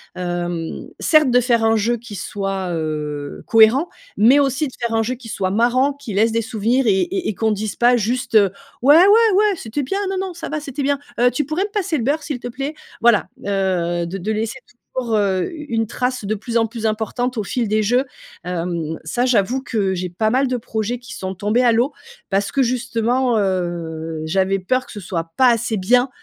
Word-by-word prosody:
hem: 175 -2 -4
certes 305 -5 +4
de 245 - +5
faire 235 -2 +2
un 225 0 +3
jeu 230 +3 +1
qui 230 -2 -10
soit, 195 -1 -3
heu, 150 -2 -4
cohérent, 225 +9 +5 0.3
mais 245 +7 +6
aussi 275 +2 +1
de 255 - -11
faire 235 -2 -2
un 225 - +3
jeu 250 +3 -2
qui 240 -2 -12
soit 190 -3 -1
marrant, 245 +6 +2
qui 275 -6 -8
laisse 220 +3 +2
des 230 - +1
souvenirs 235 +3 0
et 190 -2 +4
et 370 +1 -2
et - - -1
qu'on 220 +2 +1
dise 210 0 -3
pas 245 +1 +5
juste, 240 +2 -2
heu: 200 -3 +6 0.3
«Ouais, 285 +4 +7
ouais, 420 +4 +6
ouais, 420 +1 +4
c'était 230 +1 -4
bien. 390 +10 -2
Non, 385 - -2
non, 380 -1 -3
ça 340 - -7
va, 310 - -2
c'était 285 -1 -5
bien. 280 0 +1 0.2
Heu 245 0 +5
tu 280 +4 -1
pourrais 310 +7 -1
me 415 - -8
passer 395 -6 -1
le 240 - -2
beurre, 290 +6 0
s'il 285 -5 -4
te 245 - -5
plaît?» 275 +5 -4 0.3
Voilà, 230 -3 +4 0.2
heu, 180 -4 0
de 185 +3 -5
de 205 +4 -3
laisser 225 +4 -3 0.4
toujours, 240 -4 -1
heu, 195 -3 +1
u 300 -3 -8
une 225 -1 0
trace 250 -1 -2
de 215 +2 -1
plus 230 +3 -2
en 225 -1 +2
plus 225 0 -6
importante 225 +3 -1
au 215 - 0
fil 235 +1 -1
des 215 +1 +2
jeux, 245 +5 +2 0.4
hem, 170 -2 -3
ça, 240 +10 0
j'avoue 250 +1 +2
que 200 -7 -1
j'ai 180 0 -3
pas 215 +5 0
mal 265 +2 +2
de 250 - 0
projets 225 +1 -3
qui 245 - -11
sont 190 0 -5
tombés 210 +6 +1
à 240 - +5
l'eau 245 +5 +1 0.4
parce 200 +1 0
que 275 - +1
justement, 245 0 +1
heu, 170 -4 -2
j'avais 190 +4 +1
peur 255 +8 0
que - - -13
ce 210 - -7
soit 170 -3 -4
pas 260 - +6
assez 230 -1 0
bien, 245 +7 +3
225 Hz, 220 wpm, -20 LUFS, 195-255 Hz, 0.4 s, Ouais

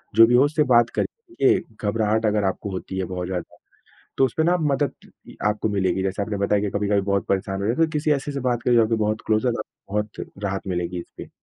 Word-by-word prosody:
जो 115 +1 +9
भी 120 - +3
हो, 125 - +6
उससे 150 +1 +2
बात 120 0 +5
करके, 405 -7 +1 0.2
घबराहट 110 +1 +1
अगर 105 -1 +2
आपको 95 +1 -2
होती 95 0 -5
है 95 - -1
बहुत 90 -1 -4
ज़्यादा, 90 -2 -5 0.6
तो 135 - +4
उसपे 130 +5 0
ना 175 +2 +3
मदद 145 -3 0 0.5
आपको 105 +1 0
मिलेगी। 95 -2 0
जैसे 95 +1 -1
आपने 105 0 -3
बताया 100 +1 +2
कि 105 - -1
कभी-कभी 100 0 +1
बहुत 100 0 -1
परेशान 95 0 -1
हो - - -3
रहे 115 - +1
हैं, 165 - +3
तो 160 - -3
किसी 150 0 0
ऐसे 145 +1 -2
से 140 - -3
बात 125 -2 0
करें, 125 - +3
जो 115 - +6
आपके 115 +1 +1
बहुत 110 +1 -1
क्लोज़ 110 +3 +2
हैं, 120 - +2
तो - - -4
आपको 100 - -21
बहुत 105 0 -3
राहत 95 -1 -2
मिलेगी 90 -1 -2
इसपे। - - -11
105 Hz, 240 wpm, -23 LUFS, 100-125 Hz, 0.6 s, जो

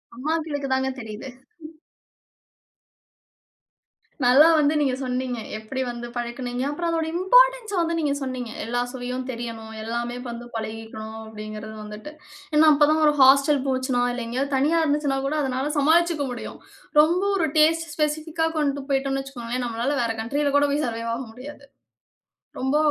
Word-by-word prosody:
அம்மாக்களுக்கு 300 +1 -2
தாங்க 265 0 +1
தெரியுது. 220 +2 -7 3.0
நல்லா 265 +6 +7
வந்து 295 +1 +3
நீங்க 270 -3 +1
சொன்னீங்க. 250 -1 -2 0.2
எப்டி 220 +5 -5
வந்து 240 0 -6
பழகுனீங்க? 245 +1 -3
அப்பறம் 335 +4 -2
அதோட 325 -1 0
இம்பார்ட்டன்ஸ - - +4
வந்து 335 0 0
நீங்க 295 -3 +1
சொன்னிங்க. 255 -3 -4
"எல்லா 240 +2 -1
சுவையும் 250 0 -4
தெரியணும். 230 -2 -6
எல்லாமே 235 +1 -3
வந்து 235 0 -7
பழகிக்கணும்." 220 0 -6
அப்டிங்குறது 215 0 -8
வந்துட்டு, 210 +8 -9 0.4
ஏன்னா 310 +1 +6
அப்ப 295 0 +4
தான் 315 0 +2
ஒரு 300 - +5
ஹாஸ்டல் 275 +1 +6
போச்சுனா, 260 -1 0
இல்ல 245 -1 -4
எங்கயாவது 270 +4 -1
தனியா 310 +5 +2
இருந்துச்சுன்னா 290 -2 +1
கூட 305 +2 -1
அதனால 265 +2 -1
சமாளிச்சுக்க 320 +1 +3
முடியும். 235 - -8 0.4
ரொம்ப 345 +5 +2
ஒரு 325 -3 +1
டேஸ்ட் 325 +2 +4
ஸ்பெசிஃபிக்கா 310 +2 0
கொண்டுட்டு 280 -2 -1
போயிட்டோனு 270 0 0
வச்சுக்கோங்களேன், 250 -2 -4
நம்மளால 240 +5 -1
வேற 230 - 0
கண்ட்ரியில 285 +5 0
கூட 290 - +4
போய் 295 +1 0
சர்வைவ் 230 0 -3
ஆக 260 - -5
முடியாது. 280 +4 -10 1.0
ரொம்ப 265 +3 +1
270 Hz, 140 wpm, -24 LUFS, 240-300 Hz, 3.0 s, நல்லா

